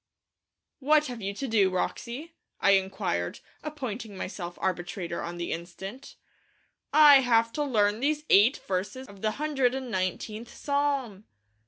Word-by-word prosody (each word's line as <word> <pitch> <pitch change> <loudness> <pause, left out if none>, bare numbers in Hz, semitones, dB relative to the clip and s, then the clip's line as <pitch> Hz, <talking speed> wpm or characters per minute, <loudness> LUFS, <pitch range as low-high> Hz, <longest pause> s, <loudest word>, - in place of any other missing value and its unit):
'What 300 +2 +4
have 245 -4 -6
you 195 0 -2
to 270 - -4
do, 210 -5 +3
Wroxie?' 240 - -3 0.3
I 200 - +4
inquired, 190 - 0 0.2
appointing 245 -9 -6
myself 175 -2 -6
arbitrator 175 -1 -3
on 170 +1 -5
the 170 - -3
instant. 190 +9 -7 0.8
'I 295 -2 +8
have 230 -3 +2
to 295 - -1
learn 210 -6 +2
these 300 +3 0
eight 215 +8 +6
verses 200 +8 -3
of 200 -1 -14
the 215 -1 0
hundred 275 -4 0
and 260 -2 -5
nineteenth 210 +4 -3
Psalm!' 280 -8 -1
225 Hz, 140 wpm, -28 LUFS, 190-270 Hz, 0.8 s, I